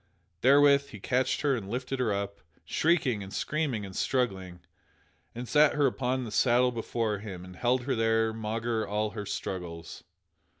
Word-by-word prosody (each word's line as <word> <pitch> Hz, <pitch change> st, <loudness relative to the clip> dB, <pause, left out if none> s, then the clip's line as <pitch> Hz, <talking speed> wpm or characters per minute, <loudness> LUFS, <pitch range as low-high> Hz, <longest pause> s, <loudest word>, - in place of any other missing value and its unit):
Therewith 140 Hz, +1 st, +5 dB
he 105 Hz, -, -10 dB
catched 130 Hz, +5 st, 0 dB
her 145 Hz, -3 st, +2 dB
and 100 Hz, -5 st, -6 dB
lifted 130 Hz, +3 st, -3 dB
her 120 Hz, -4 st, +1 dB
up, 100 Hz, 0 st, -3 dB, 0.2 s
shrieking 145 Hz, -10 st, +1 dB
and 95 Hz, 0 st, -8 dB
screaming 140 Hz, -8 st, -2 dB
and 95 Hz, -1 st, -10 dB
struggling, 95 Hz, -9 st, -1 dB, 0.7 s
and 120 Hz, +1 st, -5 dB
sat 150 Hz, +2 st, +4 dB
her 145 Hz, -1 st, +3 dB
upon 130 Hz, 0 st, 0 dB
the 115 Hz, -, -6 dB
saddle 125 Hz, +3 st, +3 dB
before 115 Hz, -2 st, -2 dB
him 95 Hz, -4 st, -8 dB
and 90 Hz, 0 st, -11 dB
held 125 Hz, +4 st, +1 dB
her 135 Hz, -, -1 dB
there 115 Hz, 0 st, +2 dB
maugre 115 Hz, +1 st, -2 dB
all 105 Hz, +1 st, -1 dB
her 105 Hz, -2 st, -6 dB
struggles. 85 Hz, -3 st, -6 dB
115 Hz, 165 wpm, -29 LUFS, 105-130 Hz, 0.7 s, Therewith